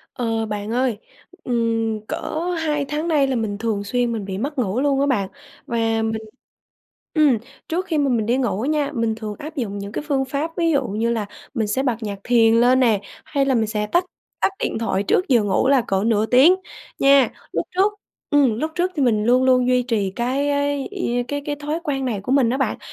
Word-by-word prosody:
Ờ, 225 -2 -1
bạn 210 0 -4
ơi, 245 -3 0 0.5
ừm, 225 -2 0
cỡ - - -3 0.4
2 300 -3 0
tháng 305 +3 -2
nay 295 -4 +3
là 265 -2 -1
mình 210 -3 -2
thường 215 -2 -2
xuyên 245 +3 0
mình 220 -3 -3
bị 190 -1 -5
mất 280 +6 -4
ngủ 225 -1 0
luôn 275 -1 +2
á 280 - +2
bạn. 205 -9 0 0.4
Và 235 - -3 0.3
mình 220 0 -2 0.9
ừm, 295 -7 +4 0.3
trước 360 +4 -1
khi 325 -5 -1
mà 285 -1 +2
mình 225 -3 +1
đi 240 +2 +2
ngủ 240 -5 -1
nha, 295 0 0
mình 230 -2 0
thường 215 -1 -6
áp 310 +2 -8
dụng 205 -7 -3
những 200 +1 -6
cái - - -4
phương 270 -2 +1
pháp 280 +5 -3
ví 335 -1 +2
dụ 275 -5 +1
như 225 +4 -1
là 220 -3 -1 0.3
mình 225 -4 0
sẽ 235 +6 0
bật 250 -4 0
nhạc 200 -2 -4
thiền 230 -2 +4
lên 245 +3 +4
nè, 225 -6 +3 0.2
hay 275 -1 0
là 270 - +1
mình 225 -2 +2
sẽ 210 -1 -2
tắt 345 +11 +2 0.4
tắt - - +3
điện - - -2
thoại 220 -3 0
trước 365 - +1
giờ 245 -5 +4
ngủ 205 +6 +1
là 275 -2 +5
cỡ 195 0 +1
nửa 220 -1 +2
tiếng 265 +10 +6 0.4
nha. 275 -3 +5 0.2
Lúc - - -1
trước 400 +3 +3 0.4
ừm, 270 -7 +3
lúc 315 - -1
trước 360 +1 0
thì 295 - 0
mình 220 -5 +2
luôn 250 +3 +4
luôn 250 -1 +4
duy 250 0 +3
trì 220 -6 -1
cái 260 +4 0
cái 285 -1 0
ia 245 -12 -1
cái 285 0 -3
cái 295 - -1
thói 300 +3 -3
quen 275 -4 -1
này 225 -6 -2
của 225 +6 -3
mình 265 -4 +4
á 255 - 0
bạn, 265 - -1
250 Hz, 230 wpm, -21 LUFS, 220-285 Hz, 0.9 s, tiếng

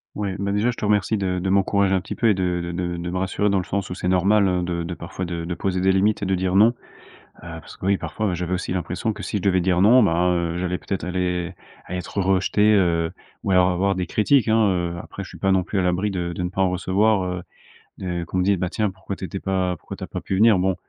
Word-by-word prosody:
Oui, 105 -1 -2
bah, 100 0 -1
déjà, 105 +5 +1
je - - -9
te - - -8
remercie 105 +1 +2
de 95 -2 -1
de 95 +1 -2
m'encourager 100 0 +2
un 95 - +2
petit - - -6
peu 115 - +2
et - - +5
de 90 -2 -1
de 85 - -4
de 85 0 -3
de 85 +1 -4
me - - -4
rassurer 95 +2 0
dans 100 - +2
le - - -2
sens 100 0 -3
où - - -1
c'est 90 - -4
normal, 95 +3 +3
heu, 90 -1 0
de 85 -1 -2
de 85 +1 -4
parfois 85 +2 -6
de 85 -1 -4
de 85 - -3
poser 90 +1 -2
des 95 +1 +4
limites 100 +2 +2
et - - 0
de 95 - 0
dire 95 0 0
non. 105 +4 +7
Heu, - - -4 0.9
parce - - -13
que 95 - -5
oui, 100 0 +3
parfois, 90 +6 -2
j'avais 90 +1 -3
aussi 90 - -3
l'impression 90 +5 -2
que 105 -1 -9
si - - -2
je - - -4
devais 95 -1 +2
dire 90 0 +2
non, 120 +5 +6
ben, 90 -1 +2
heu, 85 -1 -1
j'allais 90 0 -1
peut-être, 95 -2 -4
allez 90 -1 -2 0.3
allez, 90 - -4
être 90 +3 -5
rejeté, 95 +3 +3
heu, 85 -4 +2 0.3
ou - - -2
alors 90 -1 +4
avoir 95 +2 +1
des 90 -1 -2
critiques, 110 - +2
hein, 110 -1 +4
heu, 85 -2 -1
après, 100 - -8
je - - -11
suis - - -12
pas 95 - +2
non 95 -1 +3
plus 100 - -2
à - - +2
l'abri 90 +3 0
de 85 -2 -3
de 90 - -4
ne 90 - -1
pas 95 - -2
en 95 - +3
recevoir, 95 +3 +1
heu, 90 0 -3 0.6
n 90 -2 -2
heu, - - -8
qu'on 95 - -4
me - - +2
dise: 100 +1 +2
«Ben 90 - -1
tiens, 105 +2 0
pourquoi 95 +1 -7
tu - - -11
étais 95 +1 -4
pas 95 -2 -1
pourquoi - - -9
tu - - -9
as - - -5
pas - - -5
pu - - -3
venir?» 105 0 +5
Bon, 95 0 +1
95 Hz, 290 wpm, -23 LUFS, 90-100 Hz, 0.9 s, non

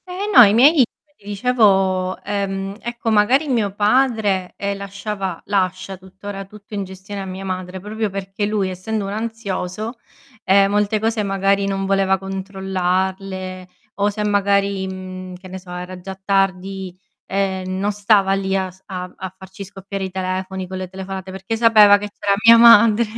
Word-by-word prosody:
Eh 370 +3 -4
no, - - +10
i 205 -2 +5
miei 265 +6 +7
come 290 -6 +5 0.3
ti 200 - -25
dicevo, 195 -4 +2
ehm, 195 -1 -3
ecco 235 -1 -3
magari 245 +8 +3
mio 225 -6 +1
padre, 210 -4 +1
ehm, 200 0 -2
lasciava 200 -2 -5
lascia 190 -1 -1
tuttora 195 +2 -9
tutto 210 +2 -15
in 200 -1 -2
gestione 190 +1 -8
a - - -5
mia 190 +1 -7
madre, 185 0 -5
proprio 215 +2 -3
perché 195 +1 -4
lui, 205 -3 0
essendo 200 +3 -3
un 195 - -4
ansioso, 220 0 -4 0.5
ehm, 195 +1 +4
molte 210 +1 +1
cose 220 0 0
magari 195 0 +1
non 195 0 -2
voleva 195 0 +2
controllarle 190 -1 -3 0.3
o 205 0 +1
se 210 +1 -3
magari, 200 -1 +1
mhmm, 185 -1 -7
che 185 +1 -12
ne 190 +1 -7
so 180 0 -17
era 180 +1 -7
già 190 +1 -7
tardi, 190 -1 -1 0.3
ehm, 190 -1 -2
non 205 +2 0
stava 200 -1 +3
lì 195 0 -1
a 190 -1 -2
s 185 +1 -23
a 185 -2 -5
a 190 0 -8
farci 190 +1 -10
scoppiare 195 0 -7
i - - -5
telefoni 185 0 -3
con 190 +1 -6
le 185 0 -5
telefonate, 190 0 -7
perché 190 +4 -4
sapeva 215 -3 +6
che 205 0 -5
c'era 200 -1 +1
mia 230 0 +9
madre 230 -1 +7
195 Hz, 170 wpm, -20 LUFS, 190-205 Hz, 0.5 s, no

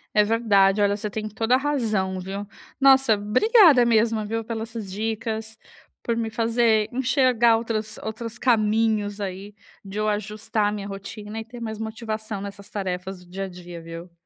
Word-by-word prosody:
É 210 - +6
verdade. 205 -3 +3
Olha, 200 0 +3
você 210 0 -4
tem 215 +1 -4
toda 225 +3 +1
a - - +7
razão, 215 -10 -1
viu. 195 +2 -5 0.3
Nossa, 270 -4 +6
obrigada 270 - +5
mesmo, 225 -1 +2
viu, 225 +1 -3
pelas 225 0 -4
essas 220 -4 -6
dicas, 220 +1 -3 0.5
por 235 - -1
me 230 -1 -1
fazer 225 -1 +2
enxergar 250 -3 +3
outras 220 -1 -3
outros 225 +1 -5
caminhos 215 -3 +1
aí, 195 +1 -6 0.3
de 200 +1 -7
eu 215 - 0
ajustar 210 +1 -1
a - - -1
minha 205 -1 -5
rotina 205 +2 -7
e - - -7
ter 240 +1 -10
mais 220 -2 -5
motivação 220 -1 -5
nessas 200 0 -8
tarefas 185 -1 -4
do 175 - -21
dia 195 +2 -4
a 195 - -5
dia, 175 -1 -10
viu. 165 +1 -9
215 Hz, 175 wpm, -24 LUFS, 200-230 Hz, 0.5 s, a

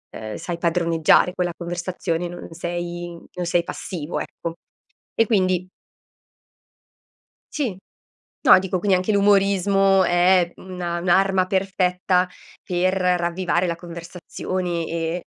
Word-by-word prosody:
uhm, 110 -1 -6
sai 175 -1 -5
padroneggiare 170 0 +3
quella 180 -1 -1
conversazione, 175 0 -3
non 175 0 -8
sei 175 0 -5 0.2
non 180 -1 -4
sei 170 0 +2
passivo 170 -2 -5
ecco 165 - -6 0.6
e 225 - +4
quindi 185 -4 +1 1.9
sì, 250 -11 -1 0.7
no - - +8
dico, 185 -1 -2
quindi 195 +1 +2
anche 185 +3 -1
l'umorismo 195 -1 +4
è 175 0 +3
una 175 -2 -4
un'arma 190 +1 +3
perfetta 185 -1 +1 0.3
per 185 +1 0
ravvivare 180 -1 +1
la 170 - -1
conversazione 175 0 -5
e 165 +1 -3
180 Hz, 110 wpm, -22 LUFS, 170-185 Hz, 1.9 s, no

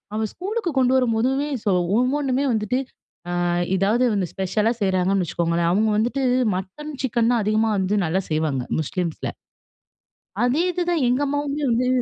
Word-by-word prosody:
அவன் 220 -1 -1
ஸ்கூலுக்கு 395 0 -3
கொண்டு 255 0 +3
வரும்போதுமே 255 +3 +1 0.2
ஸோ - - 0 0.3
ஒவ்வொன்னுமே 265 +1 +1
வந்துட்டு 220 +2 0 0.5
அ - - -2 0.4
எதாவது 205 +6 +2
வந்து 200 -3 0
ஸ்பெஷலா 210 +4 0
செய்றாங்கன்னு 190 0 +1
வச்சுக்கோங்களேன் 170 +1 0
அவுங்க 215 +4 +2
வந்துட்டு, 245 +5 0 0.3
மட்டன் 200 +12 -6
சிக்கன் 240 -2 +1
தான் 235 -2 +2
அதிகமா 215 +2 +2
வந்து 190 +2 0
நல்லா 165 +4 0
செய்வாங்க. 155 -4 0 0.2
முஸ்லீம்ஸ்ல. 170 +2 -3 1.1
அதே 260 +7 +2
இது 360 0 -3
தான் 335 -5 +1
எங்க 250 +3 +1
அம்மாவுமே 285 +1 -2
வந்து 240 +2 +1
225 Hz, 145 wpm, -22 LUFS, 190-265 Hz, 1.1 s, கொண்டு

